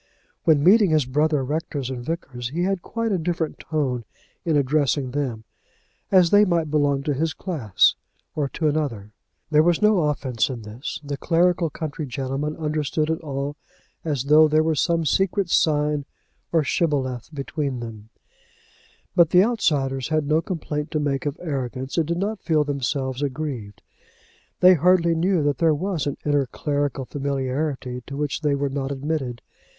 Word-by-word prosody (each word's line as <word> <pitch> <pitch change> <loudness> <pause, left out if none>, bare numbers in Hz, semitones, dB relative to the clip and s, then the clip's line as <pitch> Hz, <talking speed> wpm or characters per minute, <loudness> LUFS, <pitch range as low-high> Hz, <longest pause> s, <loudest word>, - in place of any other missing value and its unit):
When 155 -4 +4
meeting 200 +3 +6
his 155 -4 +3
brother 150 +2 +1
rectors 145 -2 -3
and 125 -2 -5
vicars, 130 -6 -4
he 170 +6 -2
had 195 -1 0
quite 230 +3 -3
a 190 - +1
different 165 -1 -2
tone 135 -6 -2 0.4
in 160 -3 +2
addressing 140 -1 +1
them, 125 -6 -3 0.7
as 185 -3 +5
they 205 0 +7
might 170 -6 +1
belong 145 -2 +2
to 145 - 0
his 155 +2 -1
class, 135 - +2 0.4
or 145 -3 -1
to 155 +4 -1
another. 135 -9 -2 0.4
There 150 0 +6
was 170 +1 +3
no 210 -8 +3
offence 125 -7 -1
in 120 -4 -6
this. 110 +7 -6
The 140 -1 -4
clerical 170 +1 +2
country 150 0 -5
gentlemen 135 +4 -3
understood 155 0 -1
it 160 - -2
all 140 -1 -4 0.5
as 145 -6 -1
though 155 +2 +6
there 155 +1 +3
were 160 0 +1
some 165 +1 +1
secret 195 +3 +1
sign 150 -2 +2 0.5
or 165 -2 +3
shibboleth 135 -6 -1
between 140 -2 -3
them; 110 -2 -8 1.1
but 170 -2 +5
the 180 +2 +6
outsiders 140 - 0
had 155 -1 0
no 155 +2 +2
complaint 155 -4 -4
to 155 - -1
make 145 -1 -1
of 145 - -3
arrogance, 135 -4 -4
and 165 -3 +1
did 170 +1 -1
not 205 +2 -2
feel 155 -3 +2
themselves 135 -1 -2
aggrieved. 130 -7 -4 0.8
They 185 +1 +8
hardly 170 0 +4
knew 170 0 +1
that 145 -3 0
there 160 -2 +4
was 175 -2 -2
an 140 - -2
inner 145 -2 +2
clerical 145 0 -2
familiarity 135 -1 -3
to 140 - -6
which 150 0 -2
they 145 -2 +1
were 140 0 -1
not 135 0 -3
admitted. 135 -3 -3
150 Hz, 165 wpm, -23 LUFS, 135-165 Hz, 1.1 s, They